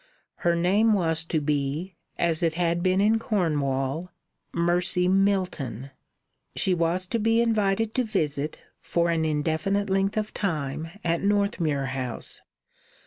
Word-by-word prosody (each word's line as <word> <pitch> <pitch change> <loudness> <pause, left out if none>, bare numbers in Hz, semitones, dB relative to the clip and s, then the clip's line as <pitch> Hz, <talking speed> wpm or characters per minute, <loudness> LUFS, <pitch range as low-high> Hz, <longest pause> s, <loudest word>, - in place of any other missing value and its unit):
Her 170 0 +1
name 200 +6 +3
was 165 -5 +1
to 160 - 0
be, 150 +4 -2 0.2
as 165 -2 +1
it 165 -2 +1
had 170 0 +1
been 185 +1 +2
in 215 +3 +3
Cornwall, 155 - -1 0.4
Mercy 175 +1 +2
Milton. 185 - 0 0.6
She 190 - +2
was 175 +2 0
to 230 +5 -2
be 225 +1 +3
invited 220 -1 +1
to 255 - +1
visit, 155 -9 -2 0.2
for 170 0 0
an 160 -1 +1
indefinite 160 +6 0
length 195 +2 +1
of 215 0 -2
time, 155 -5 -2 0.2
at 170 -1 0
Northmuir 200 - +1
House. 130 -3 -4
175 Hz, 135 wpm, -26 LUFS, 155-200 Hz, 0.6 s, name